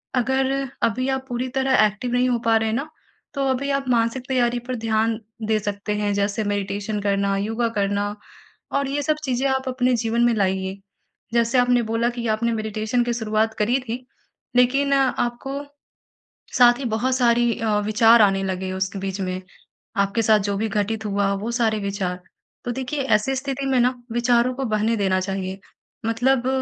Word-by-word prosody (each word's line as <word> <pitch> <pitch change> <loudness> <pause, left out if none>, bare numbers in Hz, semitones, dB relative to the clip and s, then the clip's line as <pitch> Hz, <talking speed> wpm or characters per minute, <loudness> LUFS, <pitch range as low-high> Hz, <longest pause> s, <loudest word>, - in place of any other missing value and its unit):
अगर 265 +2 +1 0.3
अभी 255 +4 +1
आप 265 0 -2
पूरी 245 +1 -2
तरह 265 -4 +4
एक्टिव 210 +4 -2
नहीं 250 +1 +2
हो 240 - +1
पा 225 -1 +4
रहे 220 0 0
हैं 220 - -1
न 300 - -5 0.5
तो 275 -1 -1
अभी 270 +2 -1
आप 270 - -7
मानसिक 235 +1 +1
तैयारी 245 -2 +1
पर 255 - -2
ध्यान 220 +1 +1 0.3
दे 215 -1 +2
सकते 205 0 -3
हैं 205 -1 0
जैसे 200 +2 0
मेडिटेशन 205 +1 -2
करना, 200 -1 +1
योगा 225 +4 -1
करना 205 +1 0 0.6
और 280 - -1
ये 285 +1 -1
सब 310 +1 +1
चीज़ें 260 +1 0
आप 265 0 -1
अपने 255 0 +1
जीवन 230 +1 0
में 240 - +3
लाइए। 190 -1 -1 0.6
जैसे 235 +1 +2
आपने 245 -1 +3
बोला 235 +1 +1
कि 235 - -2
आपने 225 +2 +1
मेडिटेशन 220 +2 -1
की 240 - 0
शुरुआत 220 -1 0
करी 240 +5 +2
थी, 250 +1 -6 0.5
लेकिन 275 +3 +3
आपको 270 +1 0 0.9
साथ 240 -1 +7
ही 270 - -4
बहुत 255 +3 +1
सारी 240 -1 +3
अ, 215 -2 +1
विचार 225 +1 +5
आने 195 -1 +3
लगे 190 0 -3
उस 190 +1 -2
बीच 195 0 -4
में 185 0 -3 0.6
आपके 200 +3 +1
साथ 215 0 +5
जो 200 - 0
भी 220 +2 0
घटित 215 +2 -1
हुआ 200 -1 +1
वो 230 - -2
सारे 225 -3 +1
विचार 195 -2 -3 0.5
तो 245 - -1
देखिए 265 +3 -3
ऐसी 265 +6 0
स्थिति 275 0 -3
में 260 -2 +2
न 250 +1 +3 0.2
विचारों 240 +1 +2
को 270 - -3
बहने 220 0 +1
देना 190 -2 +1
चाहिए, 190 0 -4 0.5
मतलब 245 +2 +1
230 Hz, 180 wpm, -23 LUFS, 205-250 Hz, 0.9 s, साथ